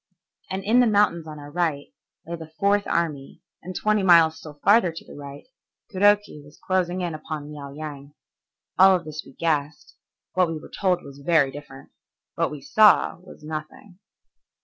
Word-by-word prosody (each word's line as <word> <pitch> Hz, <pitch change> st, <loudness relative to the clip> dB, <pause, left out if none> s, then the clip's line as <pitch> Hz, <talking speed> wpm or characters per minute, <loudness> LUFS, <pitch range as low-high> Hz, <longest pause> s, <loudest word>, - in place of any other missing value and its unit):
And 190 Hz, +1 st, -4 dB
in 225 Hz, +5 st, +3 dB
the 245 Hz, -, +5 dB
mountains 200 Hz, -6 st, +2 dB
on 155 Hz, -1 st, -8 dB
our 145 Hz, 0 st, -10 dB
right 160 Hz, -4 st, -2 dB, 0.3 s
lay 170 Hz, -, -5 dB
the 160 Hz, -1 st, -10 dB
Fourth 200 Hz, 0 st, +2 dB
Army, 150 Hz, -5 st, -3 dB, 0.2 s
and 185 Hz, +2 st, -8 dB
twenty 215 Hz, -1 st, +1 dB
miles 165 Hz, -4 st, +5 dB
still 150 Hz, -2 st, -11 dB
farther 205 Hz, -4 st, +5 dB
to 165 Hz, -, -10 dB
the -, -, -13 dB
right, 140 Hz, 0 st, -10 dB, 0.5 s
Kuroki 205 Hz, -4 st, +2 dB
was 145 Hz, +1 st, -17 dB
closing 185 Hz, -1 st, 0 dB
in 175 Hz, -2 st, -3 dB
upon 155 Hz, -1 st, -7 dB
Liao 140 Hz, -2 st, -8 dB
Yang. 145 Hz, -1 st, -9 dB, 0.6 s
All 190 Hz, 0 st, +8 dB
of 175 Hz, -3 st, -4 dB
this 155 Hz, 0 st, -6 dB
we 135 Hz, -, -16 dB
guessed, 150 Hz, -1 st, -2 dB, 0.4 s
what 185 Hz, -1 st, +3 dB
we 165 Hz, -1 st, -4 dB
were 155 Hz, -, -12 dB
told 185 Hz, -3 st, 0 dB
was 140 Hz, 0 st, -12 dB
very 140 Hz, -2 st, +2 dB
different, 135 Hz, -1 st, -12 dB, 0.4 s
what -, -, 0 dB
we 150 Hz, -2 st, -8 dB
saw 210 Hz, +5 st, +4 dB
was 180 Hz, -4 st, -15 dB
nothing. 155 Hz, +5 st, -8 dB
165 Hz, 175 wpm, -24 LUFS, 150-185 Hz, 0.6 s, All